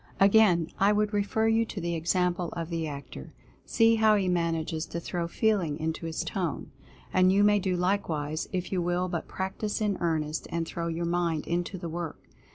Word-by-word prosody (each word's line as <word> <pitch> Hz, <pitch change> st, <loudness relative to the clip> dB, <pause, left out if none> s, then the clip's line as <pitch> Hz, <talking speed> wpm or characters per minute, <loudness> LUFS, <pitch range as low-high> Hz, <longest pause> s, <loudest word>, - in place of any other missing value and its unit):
Again 195 Hz, -3 st, +6 dB, 0.2 s
would 210 Hz, +1 st, +3 dB
I -, -, -3 dB
refer 205 Hz, +2 st, +1 dB
you 225 Hz, +1 st, +3 dB
to 215 Hz, -, -6 dB
the 170 Hz, -1 st, -2 dB
example 175 Hz, +1 st, 0 dB
of 165 Hz, 0 st, -5 dB
the 165 Hz, -1 st, -2 dB
Actor 140 Hz, -, -8 dB, 0.2 s
— -, -, -31 dB
see 225 Hz, 0 st, +6 dB
how 220 Hz, -1 st, +5 dB
he 195 Hz, -2 st, +1 dB
manages 165 Hz, -2 st, -1 dB
to 170 Hz, -, -4 dB
throw 170 Hz, 0 st, -3 dB
FEELING 180 Hz, -6 st, +1 dB
into 160 Hz, +1 st, -3 dB
his 165 Hz, +1 st, -3 dB
Tone. 170 Hz, -3 st, -3 dB, 0.4 s
And 185 Hz, 0 st, +5 dB
you 200 Hz, +1 st, +4 dB
may 205 Hz, 0 st, +5 dB
do 185 Hz, -1 st, -1 dB
likewise, 165 Hz, -5 st, -1 dB
if 185 Hz, -2 st, -3 dB
you 185 Hz, -2 st, 0 dB
will 175 Hz, +1 st, 0 dB
but 170 Hz, -2 st, -3 dB
practice 190 Hz, +3 st, -3 dB
in 205 Hz, -3 st, 0 dB
earnest, 155 Hz, -2 st, -1 dB
and 170 Hz, -1 st, -2 dB
throw 170 Hz, 0 st, -4 dB
your 170 Hz, +1 st, -2 dB
mind 170 Hz, -2 st, 0 dB
into 175 Hz, +2 st, -2 dB
the 175 Hz, -1 st, -5 dB
work. 165 Hz, -1 st, -5 dB
175 Hz, 195 wpm, -28 LUFS, 165-200 Hz, 0.4 s, Again